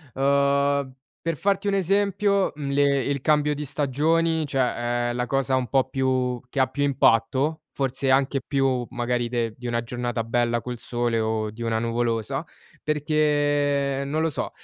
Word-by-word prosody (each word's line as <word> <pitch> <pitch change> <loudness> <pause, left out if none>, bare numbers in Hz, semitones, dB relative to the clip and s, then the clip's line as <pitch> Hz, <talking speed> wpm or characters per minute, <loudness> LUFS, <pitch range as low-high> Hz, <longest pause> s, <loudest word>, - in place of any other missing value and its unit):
Uhm, 140 0 +2 0.3
per 165 -3 -2
farti 200 0 0
un 200 - +2
esempio, 200 +1 +1
mhmm, 145 -2 -4
le 140 -1 +2
il 140 +1 -2
cambio 150 0 +2
di 150 +1 -5
stagioni, 155 +4 +1
cioè, 120 -2 0
è - - -2
la 125 0 -2
cosa 135 0 +1
un 130 -1 0
po' 135 -2 +2
più 130 -2 0
che 135 - -3
ha 130 - +5
più 145 - -5
impatto, 140 +3 +2
forse 135 0 -1
anche 135 +1 +2
più 135 -2 0
magari 120 -1 -1
de 115 -2 -1
di 125 -1 -7
una 120 0 -1
giornata 120 -1 -3
bella 120 0 0
col 120 0 -6
sole, 120 -1 -1
o 110 -1 -1
di 115 - -11
una 115 -1 0
nuvolosa, 115 +3 -1 0.4
perché 145 -2 +1
non 155 +3 -1
lo 165 - +1
so. - - -3
135 Hz, 170 wpm, -24 LUFS, 120-145 Hz, 0.4 s, ha